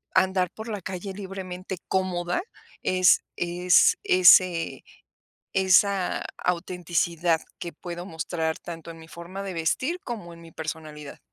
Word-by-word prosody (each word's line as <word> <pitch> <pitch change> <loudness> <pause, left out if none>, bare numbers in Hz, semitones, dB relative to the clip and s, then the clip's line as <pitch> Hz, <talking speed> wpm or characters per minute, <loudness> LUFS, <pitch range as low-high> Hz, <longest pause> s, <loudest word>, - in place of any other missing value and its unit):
andar 185 -1 +3
por 220 +1 -9
la 210 -2 -3
calle 190 +2 -5
libremente 190 -1 -6
cómoda, 180 - 0 0.4
es 185 0 +4
es 175 +1 +4
ese 180 -2 +5 0.7
esa 190 0 +3
autenticidad 175 -2 0 0.2
que 170 - -5
puedo 175 +2 -7
mostrar 160 -2 -2
tanto 165 -1 -8
en 165 - -12
mi 160 - -13
forma 170 +4 -8
de 195 -2 -5
vestir 255 - -1
como 210 -8 -6
en 170 - -14
mi 165 -1 -13
personalidad. 155 -2 -7
180 Hz, 125 wpm, -26 LUFS, 170-190 Hz, 0.7 s, ese